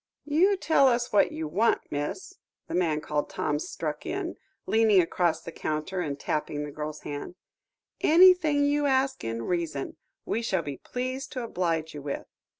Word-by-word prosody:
"You 350 +7 +3
tell 300 -6 +4
us 240 -1 +1
what 205 - +4
you 160 -1 -4
want, 205 +9 +2
miss," 145 - -4 0.3
the - - -6
man 160 -4 +1
called 150 -1 -2
Tom 150 - -1
struck 150 -1 -4
in, 370 -2 -3 0.3
leaning 220 -3 +4
across 175 -1 +1
the 165 - -7
counter, 155 +4 -3
and 145 -5 -3
tapping 150 0 -2
the 150 - -6
girl's 150 +1 -6
hand; 145 +4 -6 0.6
"anything 330 -4 +6
you 290 0 +2
ask 265 0 +1
in 115 0 -3
reason 165 -3 -2 0.3
we 230 - -1
shall 190 -7 0
be 145 -2 -5
pleased 255 +2 -4
to 255 - -3
oblige 165 -7 -1
you 145 - -7
with. 140 0 -4
180 Hz, 165 wpm, -27 LUFS, -, 0.6 s, anything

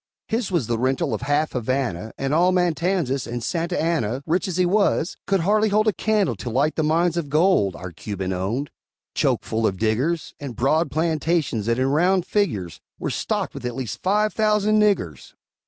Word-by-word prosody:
His 225 -1 -1
was 170 - 0
the 115 0 -1
rental 130 +2 0
of - - -3
half 145 +2 0
Havana 120 -5 -2
And 135 +1 -1
all 175 +4 +4
Matanzas; 175 -6 0
and 120 0 -4
Santa 170 +1 -1
Anna, 140 -6 -1
Rich 175 +4 0
as 180 -2 -3
he 180 - +3
was, 190 -3 +1
could 195 -2 +2
hardly 210 +4 +2
hold 215 +2 +2
A 215 - +3
candle 205 - +1
to 120 - -5
light 140 +6 +1
the - - 0
mines 165 +2 +1
of 160 -4 -2
gold 150 - +3
Our 90 0 -7
Cuban 95 +1 -4
owned, 110 +10 -2 0.4
choke - - +1
full 110 0 0
of 95 - -2
diggers; 125 - 0
And 140 -5 -6
broad 150 +8 +2
plantations, 160 -7 0
that, 115 0 +1
in 130 - +1
round 180 +5 +2
figures, 105 - -1 0.2
Were - - -3
stocked - - -2
with - - -8
at 125 -1 -3
least 125 -7 -5
five 210 +3 +1
thousand 215 0 +2
niggers! 130 - 0
155 Hz, 190 wpm, -23 LUFS, 120-185 Hz, 0.4 s, all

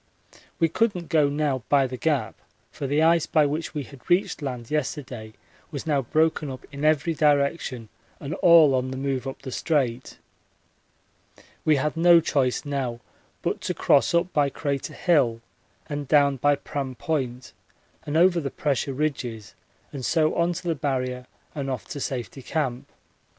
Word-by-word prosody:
We 165 - +3
couldn't 180 -1 -1
go 150 -3 +3
now 145 -3 -1
by 140 -2 +4
the 130 0 -4
Gap, 130 -5 0 0.4
for 140 - -5
the 145 +3 +2
ice 165 0 +4
by 155 -2 +3
which 155 +3 -3
we 145 - -2
had 130 +2 -15
reached 175 -2 +2
land 125 -4 -5
yesterday 130 -7 -3 0.4
was 140 -5 -6
now 145 -3 +1
broken 155 +3 +1
up 130 -1 -8
in 140 +1 -7
every 155 +2 +2
direction 140 -5 +1 0.3
and 145 +2 -5
all 165 -5 +6
on 130 0 0
the 130 - -5
move 135 -1 -2
up 135 - -7
the 130 - -6
Strait. 130 -5 -1 1.5
We 155 - +4
had 150 +3 -1
no 170 +1 +6
choice 135 -5 0
now 135 -5 -3 0.4
but - - -1
to - - -3
cross - - +3
up 170 +2 +1
by 145 -2 +3
Crater 140 -1 -3
Hill 135 -10 +2 0.5
and 145 -2 -4
down 140 -2 +4
by 145 +3 +3
Pram 135 -2 -5
Point 130 -3 -3 0.5
and 145 +2 -1
over 175 +1 +5
the 140 -4 -3
pressure 140 -2 -1
ridges 125 -8 -3 0.4
and 135 -3 -6
so 155 +3 +2
on 170 +1 +1
to 170 - -7
the 165 - +2
Barrier 130 -4 -2 0.3
and 140 -2 -4
off 130 -4 -4
to 145 - -5
Safety 130 0 -4
Camp. 130 -3 -2
140 Hz, 165 wpm, -25 LUFS, 130-155 Hz, 1.5 s, all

